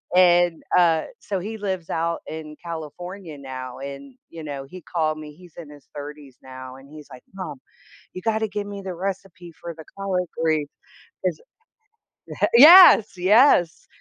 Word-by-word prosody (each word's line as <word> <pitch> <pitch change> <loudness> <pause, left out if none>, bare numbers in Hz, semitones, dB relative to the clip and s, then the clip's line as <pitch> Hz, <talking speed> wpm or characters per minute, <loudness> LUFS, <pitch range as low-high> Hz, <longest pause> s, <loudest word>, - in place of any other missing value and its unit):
and, 175 -2 +4
uh, 165 -3 +3 0.2
so 200 - -4
he 220 +4 -6
lives 190 -4 -4
out 165 +1 -2
in 155 -1 -8
California 170 +1 -8
now 130 -2 -8
and, 140 - -9
you 165 - -10
know, 140 -2 -6
he 180 +7 -12
called 155 -2 -2
me, 150 -1 -10
he's 175 0 -17
in 165 -4 -10
his 145 -1 -16
30s 145 -2 -10
now 130 0 -10
and 135 +1 -16
he's 150 -1 -13
like, 125 -1 -12
"Mom, 155 -8 -7 0.5
you 185 - -7
gotta 220 -1 0
give 205 0 -5
me 200 -1 -8
the 190 -2 -6
recipe 190 -1 -6
for 170 - -7
the 160 0 -12
collard 190 -2 -2
greens 155 -2 0 0.6
'cause" 175 -4 -1 1.1
yes, 295 - +8
yes, 185 - +3
170 Hz, 160 wpm, -23 LUFS, 150-190 Hz, 1.1 s, yes